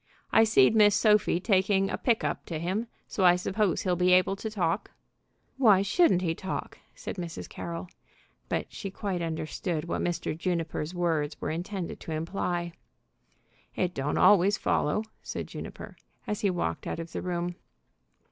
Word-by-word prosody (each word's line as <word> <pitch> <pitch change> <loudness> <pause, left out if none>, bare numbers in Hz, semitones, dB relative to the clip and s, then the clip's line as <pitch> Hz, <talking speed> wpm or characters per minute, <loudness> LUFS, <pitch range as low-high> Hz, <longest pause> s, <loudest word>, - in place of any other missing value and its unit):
I 225 - +6
seed 220 -4 +5
Miss 205 -2 +6
Sophie 210 -4 +3
taking 195 0 +2
a - - 0
pick 235 -3 +1
up - - -2
to 165 - -3
him, 190 +8 -2 0.2
so 195 - -2
I 175 -1 +7
suppose 190 0 0
he'll 180 -2 +1
be 180 +1 +3
able 185 +1 +4
to 220 +3 -5
talk." 185 -3 -1 0.7
"Why 210 -7 +5
shouldn't 200 - +3
he 165 -2 +1
talk?" 190 +3 -5 0.2
said - - -6
Mrs. 165 - -6
Carroll. 85 -1 -6 0.6
But - - -2
she 195 - -5
quite 190 -2 -3
understood 160 0 -3
what 170 - -2
Mr. 175 -2 -2
Juniper's 165 -1 -2
words 160 -4 0
were - - -2
intended 175 +2 -4
to 160 - -6
imply. 175 +1 -2 1.0
"It 180 -1 0
don't 140 +2 -1
always 200 0 +5
follow," 150 +9 +1 0.2
said - - -5
Juniper, - - -8 0.3
as 210 -1 -3
he 200 - +2
walked 170 - -2
out - - -3
of 165 0 -6
the - - -4
room. 175 -1 -2
180 Hz, 165 wpm, -28 LUFS, 165-200 Hz, 1.0 s, I